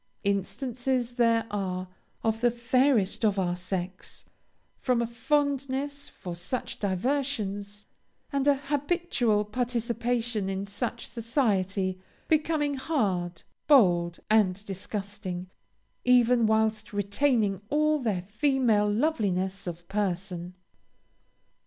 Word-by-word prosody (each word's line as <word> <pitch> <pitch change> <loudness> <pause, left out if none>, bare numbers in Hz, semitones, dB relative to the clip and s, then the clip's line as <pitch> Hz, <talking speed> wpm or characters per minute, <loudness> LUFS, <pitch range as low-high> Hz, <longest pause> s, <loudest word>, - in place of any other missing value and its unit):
Instances 240 +5 -1
there 230 -2 +3
are, 185 -2 -2 0.4
of 225 0 0
the 245 - +5
fairest 240 -3 +2
of 205 -2 +3
our 175 -2 +1
sex, 180 0 -5 0.5
from 250 -2 +1
a 235 - +1
fondness 280 +3 -1
for 175 -2 -7
such 180 +9 -4
diversions, 205 -1 -2 0.5
and 280 0 +1
a 285 - +6
habitual 280 -6 0
participation 235 -1 -1
in 195 +1 -2
such 220 +4 -4
society, 200 -6 0 0.3
becoming 305 -2 +2
hard, 200 - -1 0.2
bold, 175 - +5
and 205 -2 +3
disgusting, 195 -2 -5 0.5
even 245 -2 +5
whilst 220 0 +1
retaining 205 0 +1
all 305 +1 +3
their 210 -8 -1
female 215 0 +2
loveliness 200 - 0
of 175 0 -6
person. 185 -3 -2
220 Hz, 100 wpm, -28 LUFS, 195-255 Hz, 0.5 s, a